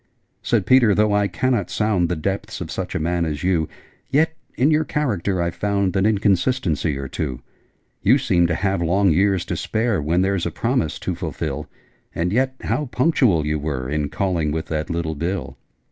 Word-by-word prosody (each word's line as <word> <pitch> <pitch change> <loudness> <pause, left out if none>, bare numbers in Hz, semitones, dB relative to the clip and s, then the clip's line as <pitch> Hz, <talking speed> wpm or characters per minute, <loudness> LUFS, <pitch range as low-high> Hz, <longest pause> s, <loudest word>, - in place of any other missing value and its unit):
Said 110 -6 +1
Peter 120 -5 +5
'Though 105 -1 +3
I 105 0 +3
cannot 130 +3 0
sound 100 -6 +1
The 90 - 0
depths 95 +5 -3
of - - -6
such - - -4
a - - 0
man 85 +2 0
as 75 -1 -3
you, 90 -4 +1 0.4
Yet 160 +4 +2 0.2
in 140 +5 +3
your 155 +1 +3
character 100 - -1
I've 85 0 -2
found 100 -2 0
An 95 +2 +3
inconsistency 100 - +1
or 70 0 -4
two. 65 -2 -4 0.6
You 110 +8 +5
seem 90 -11 +2
to 85 - 0
have 95 0 0
long 95 +3 +3
years 95 +2 +2
to 90 - -3
spare 110 +3 0
When 85 +5 +1
there's 95 -2 0
a - - -1
promise - - -1
to - - -2
fulfil: 75 -1 -4 0.5
And 90 +3 -1
yet 130 +2 +1
how 150 - -1
punctual 125 - +2
you 75 0 0
were 70 -4 -3
In 75 +1 -1
calling 90 -6 -1
with 80 +1 -2
that 75 -1 -2
little 85 -1 -2
bill!' 85 +4 -3
95 Hz, 190 wpm, -22 LUFS, 80-105 Hz, 0.6 s, Peter